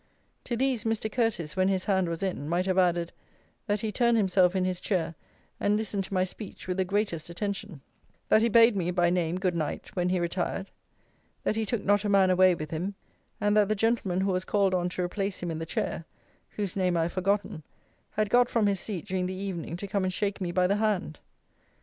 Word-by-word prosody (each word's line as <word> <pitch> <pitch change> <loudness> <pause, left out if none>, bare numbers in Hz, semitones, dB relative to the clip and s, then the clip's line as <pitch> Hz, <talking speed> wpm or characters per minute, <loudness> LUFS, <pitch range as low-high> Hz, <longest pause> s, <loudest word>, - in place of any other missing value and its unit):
To 240 - -2
these 260 -3 +1
Mr. 225 -1 -1
Curteis, 210 -10 -1
when 185 0 +2
his 190 -1 0
hand 190 -3 +1
was 165 +2 -4
in, 165 -6 -3
might 175 +2 +1
have 190 0 +2
added, 175 -2 +2 0.6
that 205 -1 0
he 220 -2 -2
turned 235 0 +3
himself 185 -3 +3
in 185 -1 +1
his 185 -1 -1
chair 175 -5 -1 0.5
and 205 +1 +2
listened 205 -3 -2
to 195 - -9
my 185 - +3
speech 190 +2 -7
with 180 0 -2
the 190 - +2
greatest 195 -4 -1
attention; 200 -3 -4 0.5
that 215 - +5
he 230 - +3
bade 230 0 +6
me, 180 -3 0
by 175 -1 +2
name, 175 0 0
good 185 -2 +1
night, 155 -3 -4
when 180 -1 +1
he 185 0 +1
retired; 175 +3 -2 0.7
that - - 0
he 220 -1 -1
took 225 -1 -2
not 205 0 +3
a 210 - -1
man 195 -2 +5
away 185 0 +5
with 155 -2 -6
him; 180 +5 -3 0.4
and 205 0 +2
that 210 -1 +4
the 215 - +2
gentleman 205 -4 +1
who 195 0 +1
was 185 0 0
called 195 -2 +1
on 180 -1 +1
to 180 0 -3
replace 195 +2 -2
him 175 - -2
in 160 - -4
the 165 - -5
chair 165 - -2 0.5
(whose 200 -4 -3
name 180 -3 +1
I 165 - +2
have 170 - -3
forgotten) 195 -3 0 0.5
had 215 -1 0
got 245 0 +5
from 230 -3 +2
his 200 -2 +1
seat 190 -4 -5
during 185 -1 -1
the 185 - -4
evening 185 -3 -4
to 200 - -6
come 195 0 -1
and 185 - 0
shake 200 +1 -2
me 175 -2 -1
by 180 +1 +2
the 200 +3 +2
hand. 205 -8 -1
190 Hz, 230 wpm, -28 LUFS, 180-205 Hz, 0.7 s, bade